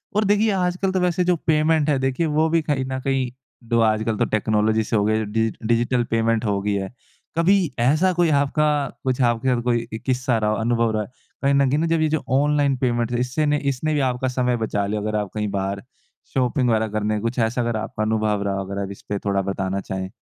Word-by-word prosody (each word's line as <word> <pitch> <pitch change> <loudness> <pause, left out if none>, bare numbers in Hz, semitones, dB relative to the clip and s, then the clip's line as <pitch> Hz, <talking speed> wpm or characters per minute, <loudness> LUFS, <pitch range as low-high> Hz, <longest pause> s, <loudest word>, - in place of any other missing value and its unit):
और 210 - +3
देखिए 210 +2 +3
आजकल 185 0 0
तो 190 - 0
वैसे 180 0 +1
जो 180 0 +2
पेमेंट 155 -1 +3
है 145 - +3
देखिए 135 +5 0
वो 160 +1 +4
भी 165 0 +2
कहीं 145 -4 -1
न 130 - -2
कहीं 135 -2 0 0.4
डो 115 -1 +2
आजकल 110 0 +1
तो - - +2
टेक्नोलॉजी 110 +1 +1
से 110 - -2
हो 105 - +3
गया 110 +1 +1
डिजिट 110 +1 -1
डिजिटल 120 +1 +2
पेमेंट 115 0 +1
हो 100 -2 0
गई 105 +1 -1
है। 100 +2 -3 0.4
कभी 190 +4 +4 0.2
ऐसा 155 +10 +3
कोई 175 -1 +2 0.2
आपका 150 +2 +1 0.4
कुछ 130 0 0
आपके 120 0 +1
साथ 120 - -2
कोई 120 -1 0
एक 110 - -5
किस्सा 125 -2 +1
रहा 105 -1 0
हो - - +1
अनुभव 115 0 +1
रहा 110 - 0
है। - - -10 0.4
कहीं 140 0 +3
न 140 -1 +3
कहीं 145 +3 +1
न 165 - +1
जब 165 -1 +1
ये 155 - +2
जो 155 0 -1 0.2
ऑनलाइन 145 -2 +2
पेमेंट 120 -2 0
है 120 - 0
इससे 145 +4 +1
इसने 145 +4 -1
भी 150 - +1
आपका 125 +1 -2
समय 125 -1 0
बचा 105 -3 -1
लिया 105 +1 -2
हो 105 - -3
अगर 110 0 -1
आप 105 -2 -3
कहीं 105 -1 -2
बाहर 100 0 -3 0.5
शॉपिंग 125 0 +1
वगैरह 110 -1 +2
करने 105 0 -1
कुछ 115 +4 -3
ऐसा 115 +2 +1
अगर 120 -1 -1
आपका 110 0 -3
अनुभव 110 -1 0
रहा 100 -1 -1
हो। 95 0 -3
अगर 100 +1 -6
अब 100 - -6
इस 100 - -11
पे 105 - -1
थोड़ा 100 -1 +1
बताना 95 0 -2
चाहें। 95 -1 -5
120 Hz, 240 wpm, -22 LUFS, 110-145 Hz, 0.5 s, वो